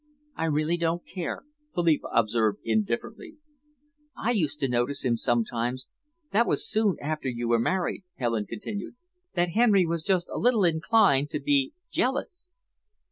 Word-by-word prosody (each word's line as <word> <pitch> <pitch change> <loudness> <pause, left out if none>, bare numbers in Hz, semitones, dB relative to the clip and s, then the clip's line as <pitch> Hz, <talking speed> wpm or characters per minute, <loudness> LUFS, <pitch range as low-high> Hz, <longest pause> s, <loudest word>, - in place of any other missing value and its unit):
"I 165 - -1
really 155 +2 +1
don't 170 0 -1
care," 180 -3 -5 0.3
Philippa 170 -3 +2
observed 110 -1 +1
indifferently. 115 - -2 0.8
"I 235 - 0
used 155 -10 0
to 135 - +2
notice 125 +3 -1
sometimes 120 +2 -1 0.4
that 235 +3 +3
was - - +1
soon 215 -3 +2
after 155 -2 -3
you 120 -1 -3
were 115 0 +3
married," 185 - -1
Helen 115 -4 -1
continued, 200 - -6 0.4
"that 175 0 +2
Henry 205 -1 +4
was 165 -1 -2
just 185 -1 +1
a - - -2
little 230 -5 +3
inclined 165 -3 +3
to - - -2
be 285 0 +1 0.2
jealous." 355 +8 -2
165 Hz, 140 wpm, -27 LUFS, 120-205 Hz, 0.8 s, Henry